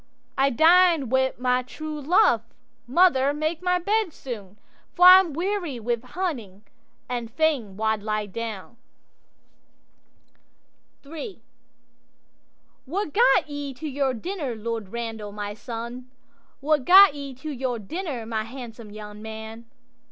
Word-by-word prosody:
'—'I 270 +1 +3
dined 325 -1 +4
wi' 260 0 +2
my 250 0 +1
true 305 +4 -7
love; 300 - +4 0.5
mother, 280 -2 +3
make 310 +2 -2
my 360 0 +2
bed 410 +1 0
soon, 210 -6 -8 0.4
For 355 - +5
I'm 365 -2 +9
weary 345 -4 -2
wi' 235 +1 -1
hunting, 250 - -5 0.4
and 240 -2 -4
fain 260 -8 0
wald 220 -1 0
lie 215 0 -2 2.8
down.'III'What 325 - -10
gat 475 -5 +4
ye 285 -2 -6
to 310 +5 -6
your 270 -2 -1
dinner, 290 - -4
Lord 225 -2 -5
Randal, 225 -2 -5
my 205 0 -5
son? 235 +3 -7 0.5
What 295 -1 +1
gat 380 +3 +8
ye 280 -2 -7
to 300 +5 -7
your 255 -3 -2
dinner, 260 - -5
my 220 -1 -2
handsome 235 -2 -9
young 210 0 -10
man? 220 +1 -8
260 Hz, 120 wpm, -24 LUFS, 225-320 Hz, 2.8 s, I'm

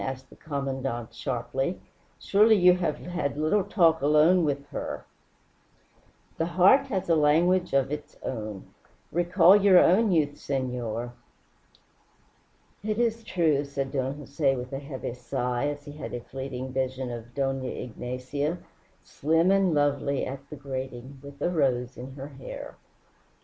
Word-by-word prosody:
asked 130 0 -6
the - - -14
Commandante 135 -5 -4
sharply. 135 +6 -2 0.4
"Surely 215 +2 +4
you 180 -2 +6
have 170 -5 -1
had 170 -5 -3
little 155 +7 +2
talk 170 -5 +3
alone 155 +5 +5
with 140 -2 -1
her?" 145 - -5 1.3
"The 165 - +1
heart 270 +10 +6
has 190 -3 -2
a 165 - +4
language 170 +5 +3
of 135 0 +2
its 150 0 -6
own. 105 -5 -5 0.5
Recall 175 +3 +5
your 200 -2 +6
own 200 +5 +5
youth, 145 -4 +1
senor." 120 -3 -3 1.7
"It 215 0 -1
is 230 -1 0
true," 160 -8 +1
said 140 -1 -4
Don 135 -1 -1
Jose, 140 -1 0
with 125 +1 -6
a 135 - -2
heavy 140 -4 -6
sigh, 125 +2 -2
as 145 0 -5
he 145 - -8
had 150 -3 -6
a - - -3
fleeting 130 +1 -6
vision 130 -1 -2
of 120 0 -8
Dona 135 -2 -1
Ignacia, 125 +6 -4 0.5
slim 165 +5 +2
and 195 -4 +3
lovely, 140 -1 +1
at 140 +1 -7
the - - -7
grating, 130 -1 -6
with 140 0 -12
a 175 - +1
rose 130 -6 0
in 130 +2 -8
her 135 +1 -8
hair. 135 -2 -9
140 Hz, 145 wpm, -27 LUFS, 130-170 Hz, 1.7 s, you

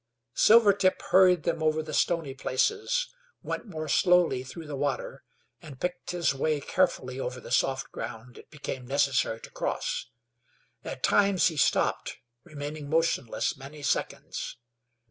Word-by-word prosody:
Silvertip 200 -4 +5
hurried 180 -3 +4
them 160 - -1
over 155 0 +1
the 155 0 -7
stony 165 -3 +1
places; 430 - 0 0.3
went - - -4
more 155 -5 -5
slowly 175 -1 +3
through 160 +5 -9
the 150 -1 -5
water, 140 -2 -3 0.4
and 135 -4 -11
picked 180 0 -4
his 175 -5 +1
way 150 +2 0
carefully 130 -5 0
over 125 -1 -4
the - - -11
soft 135 0 +1
ground 115 +2 -7
it - - -16
became 130 -4 -6
necessary 135 -4 +1
to - - -11
cross. - - -3 0.8
At - - -7
times 200 -3 +4
he 160 - -7
stopped, - - +1 0.3
remaining 145 0 -7
motionless 160 -7 0
many 140 +2 -11
seconds. 135 - -2
150 Hz, 140 wpm, -28 LUFS, 135-180 Hz, 0.8 s, Silvertip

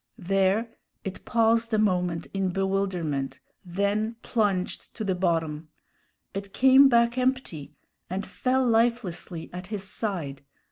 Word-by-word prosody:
There 195 +3 +1 0.4
it 190 -1 -6
paused 230 0 +2
a - - +2
moment 180 -5 +1
in 195 -1 0
bewilderment, 180 -8 -1 0.2
then 200 +5 -1
plunged 200 -6 -1
to 220 - -4
the 195 -2 +1
bottom. 165 -4 -1 0.6
It 195 0 -6
came 265 +1 +7
back 235 0 +3
empty, 255 - -1 0.3
and 190 +2 -3
fell 260 0 0
lifelessly 225 -8 0
at 180 +1 -7
his 205 -2 -4
side. 185 -9 -4
195 Hz, 125 wpm, -26 LUFS, 180-230 Hz, 0.6 s, came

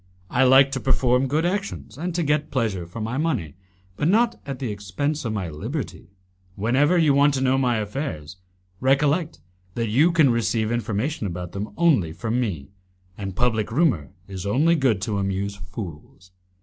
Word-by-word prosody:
I 130 +1 +3
like 135 +1 +6
to 135 - -2
perform 130 0 +2
good 155 +5 0
actions 190 - -3
and 170 +4 -4
to 175 - +1
get 150 0 0
pleasure 105 -9 -1
for 100 +7 -8
my 115 +5 -2
money, 125 - -1 0.4
but 150 - +1
not 225 +6 +2
at 135 -2 -4
the 125 -4 -3
expense 105 +9 -3
of 110 - -1
my 100 -4 -2
liberty: 75 +2 -6 0.5
Whenever 130 - +2
you 155 -4 +4
want 140 +1 +4
to 130 - -1
know 130 0 +3
my 125 -3 +1
affairs, 105 - -4 0.4
recollect 145 - +1 0.3
that 115 -2 -1
you 145 +11 +4
can 155 -6 +4
receive 115 -1 0
information 120 +3 -2
about 90 -1 -5
them 100 +2 -4
only 135 - +3
from 115 +6 -2
me, 90 - -3 0.4
and 95 -2 -6
public 110 -3 0
rumour 135 - +1 0.2
is 95 -2 -6
only 140 +12 +3
good 130 - +1
to 100 -1 -1
amuse 100 +1 -2
fools." 90 -2 -9
120 Hz, 175 wpm, -23 LUFS, 100-145 Hz, 0.5 s, like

